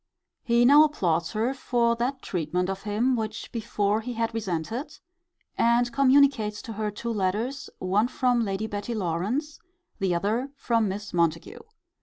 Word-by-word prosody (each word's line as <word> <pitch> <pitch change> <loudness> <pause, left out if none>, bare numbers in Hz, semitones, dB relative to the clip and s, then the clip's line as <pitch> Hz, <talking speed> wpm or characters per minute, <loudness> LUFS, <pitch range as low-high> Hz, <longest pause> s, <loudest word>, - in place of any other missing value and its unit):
He 235 0 +3
now 290 +4 +8
applauds 170 - 0
her 230 +5 0
for 235 -3 +1
that 260 +3 -2
treatment 180 +2 -1
of 195 - -6
him 220 +5 +1
which 215 -2 -4
before 215 -2 -1
he 245 +2 -5
had 230 0 -2
resented; 220 - -4 0.6
and 235 +1 +3
communicates 270 -6 +3
to 225 - -7
her 215 0 -2
two 230 +3 -5
letters, 215 +7 -2
one 195 +5 +1
from 250 -2 +1
Lady 200 0 -2
Betty 210 +2 -4
Lawrance, 210 - -2 0.4
the 190 -3 +1
other 220 +9 -1
from 230 -5 +1
Miss 200 +1 -5
Montague. 165 -2 0
220 Hz, 150 wpm, -26 LUFS, 195-245 Hz, 0.6 s, now